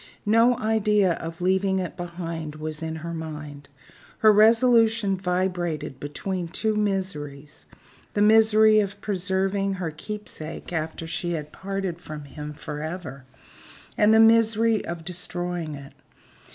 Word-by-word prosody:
No 230 Hz, +3 st, +4 dB
idea 210 Hz, -4 st, +2 dB
of 165 Hz, +2 st, -7 dB
leaving 190 Hz, +1 st, +2 dB
it 185 Hz, -2 st, -3 dB
behind 170 Hz, -3 st, -6 dB
her -, -, -12 dB
was 155 Hz, 0 st, -5 dB
in 160 Hz, 0 st, -4 dB
her 170 Hz, -, -4 dB
mind. 150 Hz, -3 st, -7 dB, 0.6 s
Her 215 Hz, -, +9 dB
resolution 225 Hz, -1 st, +4 dB
vibrated 180 Hz, -6 st, -2 dB
between 175 Hz, +5 st, -4 dB
two 215 Hz, +6 st, -1 dB
miseries 160 Hz, -9 st, -3 dB, 0.5 s
the 205 Hz, -, +2 dB
misery 220 Hz, 0 st, +6 dB
of 200 Hz, -2 st, -2 dB
preserving 195 Hz, 0 st, 0 dB
her 180 Hz, -4 st, -3 dB
keep 210 Hz, +7 st, -7 dB
sake 155 Hz, +3 st, -8 dB
after 160 Hz, 0 st, -3 dB
she 170 Hz, +2 st, -3 dB
had 150 Hz, -2 st, -5 dB
parted 190 Hz, -3 st, -4 dB
from 155 Hz, -3 st, -8 dB
him 150 Hz, +1 st, -8 dB
forever, 150 Hz, -2 st, -6 dB, 0.7 s
and 210 Hz, 0 st, +4 dB
the 220 Hz, -, +6 dB
misery 225 Hz, -1 st, +4 dB
of 170 Hz, -1 st, -6 dB
destroying 175 Hz, -3 st, -3 dB
it. 140 Hz, -1 st, -11 dB
180 Hz, 135 wpm, -25 LUFS, 160-210 Hz, 0.7 s, Her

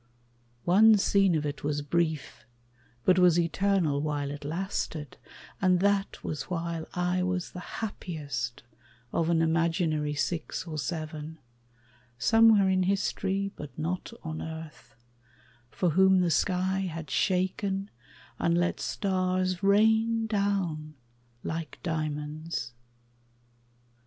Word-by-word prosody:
One 215 Hz, +5 st, +7 dB
scene 195 Hz, -2 st, +3 dB
of 150 Hz, -1 st, 0 dB
it 145 Hz, 0 st, -4 dB
Was 145 Hz, 0 st, -1 dB
brief, 160 Hz, -3 st, -1 dB, 0.6 s
but 185 Hz, 0 st, +5 dB
was 180 Hz, -2 st, +5 dB
eternal 170 Hz, -3 st, +1 dB
while 145 Hz, -2 st, -2 dB
it 145 Hz, 0 st, -7 dB
lasted; 160 Hz, -2 st, -3 dB, 0.4 s
And 185 Hz, -2 st, +4 dB
that 200 Hz, 0 st, +1 dB
was 155 Hz, -, -4 dB
while 170 Hz, -2 st, -3 dB
I 180 Hz, +1 st, +1 dB
was 180 Hz, -1 st, -1 dB
the 180 Hz, -, -7 dB, 0.2 s
happiest 145 Hz, -, -4 dB, 0.5 s
Of 165 Hz, 0 st, +1 dB
an 165 Hz, -1 st, +3 dB
imaginary 160 Hz, -2 st, +1 dB
six 165 Hz, +4 st, -2 dB
or 155 Hz, -3 st, -5 dB
seven, 155 Hz, 0 st, -5 dB, 0.8 s
Somewhere 225 Hz, -, +5 dB
in 190 Hz, 0 st, +2 dB
history 195 Hz, +1 st, 0 dB
but 145 Hz, -4 st, -9 dB
not 170 Hz, +7 st, -3 dB
on 160 Hz, 0 st, -5 dB
earth, 160 Hz, -5 st, -8 dB, 0.7 s
For 175 Hz, +6 st, 0 dB
whom 190 Hz, +2 st, +5 dB
the 175 Hz, -2 st, +2 dB
sky 185 Hz, +4 st, +1 dB
had 165 Hz, -5 st, -4 dB
shaken 190 Hz, +1 st, 0 dB, 0.5 s
and 170 Hz, 0 st, +2 dB
let 175 Hz, +1 st, 0 dB
stars 185 Hz, -2 st, 0 dB
Rain 220 Hz, +3 st, +3 dB
down 195 Hz, -8 st, -1 dB, 0.5 s
like 160 Hz, 0 st, -4 dB
diamonds. 155 Hz, -4 st, -3 dB
175 Hz, 115 wpm, -28 LUFS, 155-190 Hz, 0.8 s, One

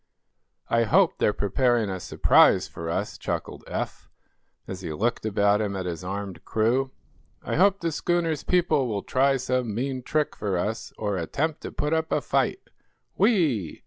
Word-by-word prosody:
"I 115 Hz, 0 st, +2 dB
hope 105 Hz, -, +3 dB
they're -, -, +3 dB
preparing 115 Hz, +3 st, +1 dB
a 95 Hz, -, -4 dB
surprise -, -, +4 dB
for 80 Hz, 0 st, -7 dB
us," 85 Hz, -, -3 dB
chuckled -, -, -4 dB
Eph, -, -, -5 dB, 0.6 s
as 95 Hz, 0 st, -6 dB
he 85 Hz, -4 st, -5 dB
looked 110 Hz, +7 st, -1 dB
about 100 Hz, 0 st, +2 dB
him 100 Hz, -2 st, -2 dB
at 95 Hz, -1 st, -3 dB
his 85 Hz, -1 st, -4 dB
armed 95 Hz, 0 st, -5 dB
crew. 120 Hz, +5 st, +1 dB, 0.5 s
"I -, -, -4 dB
hope 195 Hz, +2 st, +4 dB
the 165 Hz, -1 st, -1 dB
schooner's 165 Hz, -1 st, 0 dB
people 160 Hz, -7 st, +2 dB
will 105 Hz, -4 st, -3 dB
try 135 Hz, +1 st, +2 dB
some 125 Hz, -4 st, -1 dB
mean 130 Hz, +2 st, -2 dB
trick 150 Hz, +4 st, -1 dB
for 100 Hz, -3 st, -2 dB
us, 105 Hz, +5 st, -3 dB
or 105 Hz, -2 st, -2 dB
attempt 145 Hz, -, -2 dB
to -, -, -6 dB
put 150 Hz, +2 st, -1 dB
up 160 Hz, 0 st, 0 dB
a -, -, +2 dB
fight. -, -, 0 dB, 0.5 s
Whee!" 160 Hz, -, +1 dB
115 Hz, 170 wpm, -25 LUFS, 100-150 Hz, 0.6 s, surprise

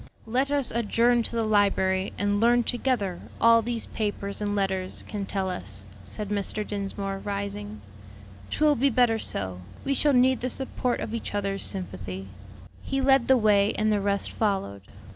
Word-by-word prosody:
"Let 255 Hz, +5 st, 0 dB
us 285 Hz, -3 st, 0 dB
adjourn 235 Hz, +1 st, +2 dB
to 230 Hz, -, -1 dB
the 230 Hz, -, +1 dB
library 195 Hz, -3 st, +2 dB
and 205 Hz, 0 st, +1 dB
learn 240 Hz, +2 st, +4 dB
together 235 Hz, -8 st, -1 dB, 0.2 s
all 230 Hz, 0 st, +6 dB
these 235 Hz, 0 st, -2 dB
papers 205 Hz, -1 st, -3 dB
and 205 Hz, 0 st, -1 dB
letters 190 Hz, -2 st, -1 dB
can 200 Hz, -2 st, -4 dB
tell 195 Hz, -1 st, -1 dB
us," 100 Hz, -, -5 dB, 0.2 s
said 200 Hz, -, -5 dB
Mr. 210 Hz, +1 st, -1 dB
Dinsmore, 195 Hz, -1 st, -4 dB
rising. 195 Hz, -, -5 dB, 0.7 s
"'Twill 305 Hz, -1 st, +3 dB
be 275 Hz, +4 st, +3 dB
better 240 Hz, -2 st, +3 dB
so; 95 Hz, -, -1 dB, 0.2 s
we 275 Hz, -, +1 dB
shall 290 Hz, +1 st, +2 dB
need 255 Hz, +1 st, +4 dB
the 255 Hz, -, -1 dB
support 255 Hz, -1 st, -2 dB
of 220 Hz, -, -4 dB
each 230 Hz, -2 st, -4 dB
other's 195 Hz, -1 st, -1 dB
sympathy." 95 Hz, -, -4 dB, 0.5 s
He 270 Hz, -, -2 dB
led 270 Hz, -2 st, +4 dB
the 265 Hz, -, +6 dB
way 210 Hz, -2 st, +3 dB
and 215 Hz, +1 st, +1 dB
the 205 Hz, -, +1 dB
rest 200 Hz, 0 st, -1 dB
followed. 190 Hz, -, -1 dB
205 Hz, 165 wpm, -26 LUFS, 195-240 Hz, 0.7 s, all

